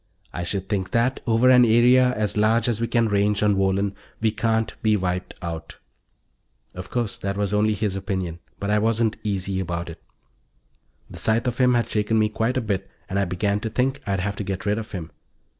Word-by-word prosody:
I 85 Hz, -, -3 dB
should 95 Hz, +2 st, -2 dB
think 95 Hz, -3 st, -2 dB
that, 125 Hz, +3 st, +1 dB
over 115 Hz, +3 st, +4 dB
an 125 Hz, -1 st, +7 dB
area 125 Hz, +2 st, +5 dB
as 105 Hz, -1 st, -1 dB
large 110 Hz, +3 st, +3 dB
as 115 Hz, -2 st, 0 dB
we 115 Hz, -, +1 dB
can 115 Hz, -1 st, +2 dB
range 105 Hz, 0 st, +1 dB
on 105 Hz, -1 st, +3 dB
Wohlen, 95 Hz, +1 st, +1 dB, 0.3 s
we 110 Hz, -1 st, +2 dB
can't 110 Hz, 0 st, 0 dB
be 110 Hz, -1 st, +3 dB
wiped 90 Hz, -1 st, -3 dB
out." 85 Hz, -1 st, -6 dB, 1.0 s
Of 90 Hz, 0 st, -8 dB
course, 120 Hz, -4 st, -2 dB
that 100 Hz, 0 st, -3 dB
was 100 Hz, 0 st, -1 dB
only 105 Hz, +1 st, +2 dB
his 105 Hz, -2 st, -1 dB
opinion; 95 Hz, -4 st, -3 dB, 0.2 s
but 100 Hz, +1 st, -2 dB
I 105 Hz, -, +3 dB
wasn't 110 Hz, 0 st, +1 dB
easy 95 Hz, -2 st, -2 dB
about 85 Hz, -2 st, -3 dB
it. -, -, -13 dB, 1.1 s
The -, -, -10 dB
sight 110 Hz, +2 st, +1 dB
of 120 Hz, -2 st, -2 dB
him 125 Hz, -1 st, +4 dB
had 120 Hz, -2 st, +1 dB
shaken 110 Hz, 0 st, 0 dB
me 110 Hz, -1 st, +3 dB
quite 115 Hz, +4 st, -1 dB
a -, -, +1 dB
bit 95 Hz, -3 st, -3 dB, 0.2 s
and 95 Hz, +1 st, 0 dB
I 100 Hz, -, +2 dB
began 100 Hz, +3 st, -1 dB
to 110 Hz, -, -4 dB
think 130 Hz, +4 st, 0 dB
I'd 95 Hz, -2 st, 0 dB
have 100 Hz, +1 st, -2 dB
to -, -, -3 dB
get 95 Hz, 0 st, -4 dB
rid 105 Hz, +1 st, +1 dB
of 110 Hz, -, -8 dB
him. 85 Hz, -6 st, -6 dB
105 Hz, 210 wpm, -23 LUFS, 95-115 Hz, 1.1 s, an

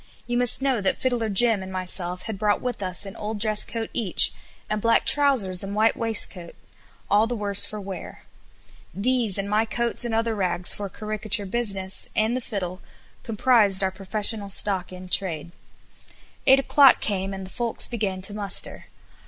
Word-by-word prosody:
You 240 Hz, -, -3 dB
must 245 Hz, +2 st, +3 dB
know 265 Hz, -5 st, 0 dB
that 195 Hz, -, 0 dB
Fiddler 240 Hz, -4 st, -1 dB
Jim 215 Hz, +1 st, +3 dB
and 190 Hz, 0 st, -8 dB
myself 180 Hz, -1 st, -2 dB
had 220 Hz, -4 st, -6 dB
brought 210 Hz, -1 st, +1 dB
with 250 Hz, -4 st, -5 dB
us 185 Hz, +1 st, -2 dB
an 195 Hz, -, -9 dB
old 210 Hz, 0 st, -5 dB
dress 215 Hz, 0 st, +4 dB
coat 225 Hz, -1 st, -6 dB
each, 210 Hz, -7 st, +2 dB, 0.3 s
and 215 Hz, 0 st, -3 dB
black 230 Hz, +1 st, +2 dB
trousers 250 Hz, -11 st, +3 dB
and 200 Hz, +1 st, -6 dB
white 220 Hz, +1 st, +2 dB
waistcoat, 210 Hz, -6 st, -2 dB, 0.5 s
all 210 Hz, +3 st, +2 dB
the 245 Hz, -, -3 dB
worse 205 Hz, -2 st, +1 dB
for 215 Hz, -, -7 dB
wear. 195 Hz, -2 st, -9 dB, 0.7 s
These, 230 Hz, -1 st, 0 dB
and 200 Hz, 0 st, -2 dB
my 210 Hz, +2 st, +1 dB
coats 235 Hz, +2 st, -2 dB
and 235 Hz, -2 st, -2 dB
other 225 Hz, 0 st, 0 dB
rags 180 Hz, -3 st, +2 dB
for 200 Hz, -1 st, -5 dB
caricature 215 Hz, +1 st, -1 dB
business, 195 Hz, -3 st, -1 dB
and 220 Hz, +3 st, +1 dB
the 255 Hz, -, -3 dB
fiddle, 185 Hz, -5 st, -6 dB, 0.4 s
comprised 215 Hz, -4 st, +2 dB
our 190 Hz, -, 0 dB
professional 200 Hz, +2 st, -1 dB
stock 195 Hz, -2 st, 0 dB
in 185 Hz, 0 st, -10 dB
trade. 170 Hz, -3 st, 0 dB, 1.0 s
Eight 265 Hz, 0 st, +7 dB
o'clock 275 Hz, -1 st, +5 dB
came 195 Hz, -2 st, -2 dB
and 190 Hz, -1 st, -7 dB
the 185 Hz, -, -13 dB
folks 235 Hz, -2 st, 0 dB
began 200 Hz, -6 st, -4 dB
to 205 Hz, -, -2 dB
muster. 205 Hz, -2 st, 0 dB
210 Hz, 175 wpm, -23 LUFS, 190-230 Hz, 1.0 s, Eight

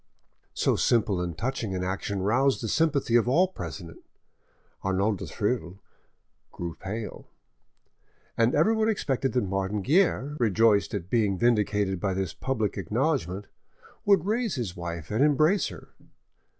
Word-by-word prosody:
So -, -, +2 dB
simple 110 Hz, -6 st, +2 dB
and 85 Hz, -3 st, -4 dB
touching 115 Hz, -6 st, -2 dB
an 90 Hz, -, -2 dB
action 95 Hz, +1 st, -3 dB
roused 130 Hz, +6 st, +2 dB
the -, -, -1 dB
sympathy 140 Hz, -3 st, +1 dB
of 120 Hz, 0 st, +4 dB
all 175 Hz, +8 st, +4 dB
present; 85 Hz, -, -8 dB, 0.8 s
Arnauld 95 Hz, +1 st, 0 dB
du -, -, -6 dB
Thill 100 Hz, -4 st, -2 dB, 0.7 s
grew 85 Hz, -1 st, -5 dB
pale, 105 Hz, +6 st, -6 dB, 1.1 s
and 115 Hz, +2 st, +2 dB
everyone 220 Hz, +8 st, +3 dB
expected 135 Hz, -, -1 dB
that 125 Hz, -, +1 dB
Martin 95 Hz, +1 st, -2 dB
Guerre, 150 Hz, -, +2 dB
rejoiced 110 Hz, -2 st, +3 dB
at 95 Hz, -2 st, -6 dB
being 105 Hz, -5 st, +2 dB
vindicated 105 Hz, -4 st, +1 dB
by 95 Hz, 0 st, -1 dB
this 95 Hz, -3 st, -2 dB
public 110 Hz, -7 st, -2 dB
acknowledgment, 105 Hz, -, -1 dB, 0.6 s
would 200 Hz, -2 st, +4 dB
raise 225 Hz, +1 st, 0 dB
his 115 Hz, -9 st, -4 dB
wife 85 Hz, -1 st, -6 dB
and 110 Hz, +6 st, +2 dB
embrace 155 Hz, +6 st, +3 dB
her. -, -, -11 dB
110 Hz, 135 wpm, -27 LUFS, 95-135 Hz, 1.1 s, of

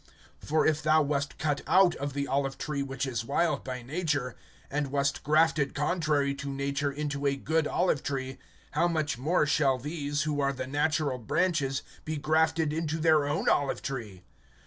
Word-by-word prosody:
(24)For 155 Hz, +1 st, +2 dB
if 155 Hz, -1 st, +1 dB
thou 155 Hz, +1 st, +4 dB
wast 145 Hz, 0 st, -2 dB
cut 150 Hz, -2 st, -1 dB
out 185 Hz, -1 st, +5 dB
of 140 Hz, 0 st, -4 dB
the 140 Hz, 0 st, -2 dB
olive 135 Hz, 0 st, -1 dB
tree 150 Hz, -1 st, -3 dB
which 135 Hz, 0 st, -3 dB
is 120 Hz, -4 st, -2 dB
wild 155 Hz, +7 st, 0 dB
by 125 Hz, -2 st, -5 dB
nature, 145 Hz, -2 st, -2 dB, 0.4 s
and 145 Hz, 0 st, 0 dB
wast 140 Hz, 0 st, 0 dB
grafted 155 Hz, -1 st, +2 dB
contrary 150 Hz, -2 st, +1 dB
to 140 Hz, 0 st, -6 dB
nature 140 Hz, +1 st, -1 dB
into 145 Hz, 0 st, -2 dB
a 140 Hz, -, +2 dB
good 155 Hz, +3 st, 0 dB
olive 175 Hz, -6 st, +1 dB
tree; 130 Hz, -1 st, -4 dB, 0.3 s
how 165 Hz, +3 st, +2 dB
much 155 Hz, -6 st, -1 dB
more 155 Hz, +4 st, +2 dB
shall 140 Hz, -3 st, +2 dB
these, 145 Hz, +2 st, -2 dB
who 150 Hz, -2 st, -1 dB
are 140 Hz, 0 st, +1 dB
the 130 Hz, -1 st, -4 dB
natural 145 Hz, -1 st, 0 dB
branches, 140 Hz, -, 0 dB, 0.2 s
be 155 Hz, 0 st, -3 dB
grafted 155 Hz, +1 st, +2 dB
into 160 Hz, 0 st, -2 dB
their 155 Hz, -2 st, +3 dB
own 150 Hz, +3 st, -1 dB
olive 140 Hz, -1 st, +1 dB
tree? 110 Hz, -9 st, -5 dB
145 Hz, 175 wpm, -29 LUFS, 140-155 Hz, 0.4 s, out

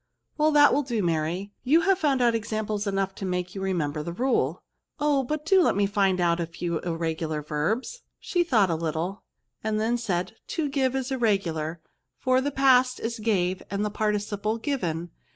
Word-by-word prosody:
" -, -, -48 dB
Well, 305 Hz, +1 st, +4 dB
that 290 Hz, -1 st, +7 dB
will 290 Hz, -, +3 dB
do, 240 Hz, -7 st, -2 dB
Mary; 170 Hz, +4 st, -1 dB
you 310 Hz, +6 st, +4 dB
have 390 Hz, +2 st, +2 dB
found 275 Hz, -6 st, +2 dB
out 235 Hz, -1 st, +4 dB
examples 215 Hz, -2 st, -2 dB
enough 195 Hz, -1 st, -1 dB
to 195 Hz, -, -9 dB
make 180 Hz, -1 st, -2 dB
you 195 Hz, -, -5 dB
remember 165 Hz, -6 st, -1 dB
the 170 Hz, -, -5 dB
rule." 250 Hz, +9 st, 0 dB, 0.2 s
'' -, -, -51 dB
Oh! 295 Hz, -2 st, +2 dB
but 300 Hz, +4 st, -3 dB
do 380 Hz, +3 st, +5 dB
let -, -, +3 dB
me 200 Hz, 0 st, +3 dB
find 195 Hz, -2 st, +1 dB
out 170 Hz, -1 st, +2 dB
a 170 Hz, -, -1 dB
few 170 Hz, 0 st, -3 dB
irre 165 Hz, -2 st, -2 dB
gular 155 Hz, -2 st, -4 dB
verbs? 215 Hz, -, -2 dB, 0.2 s
She 355 Hz, -1 st, 0 dB
thought 220 Hz, -, +3 dB
a -, -, +1 dB
little, 165 Hz, +4 st, -3 dB, 0.4 s
and 215 Hz, -1 st, 0 dB
then 230 Hz, +3 st, +1 dB
VERBS, -, -, -7 dB
S39 -, -, -6 dB
said, 180 Hz, +2 st, -1 dB
" -, -, -52 dB
To 305 Hz, -3 st, 0 dB
give 265 Hz, -2 st, 0 dB
is 265 Hz, 0 st, -2 dB
irregular; 175 Hz, -10 st, 0 dB, 0.4 s
for 255 Hz, 0 st, +2 dB
the 285 Hz, -, 0 dB
past 260 Hz, -2 st, +4 dB
is 230 Hz, +1 st, -3 dB
gave^ 190 Hz, -4 st, 0 dB
and 200 Hz, +1 st, -1 dB
the 210 Hz, -, -2 dB
participle 210 Hz, 0 st, -1 dB
given. 175 Hz, -, -2 dB
210 Hz, 210 wpm, -26 LUFS, 175-260 Hz, 0.4 s, that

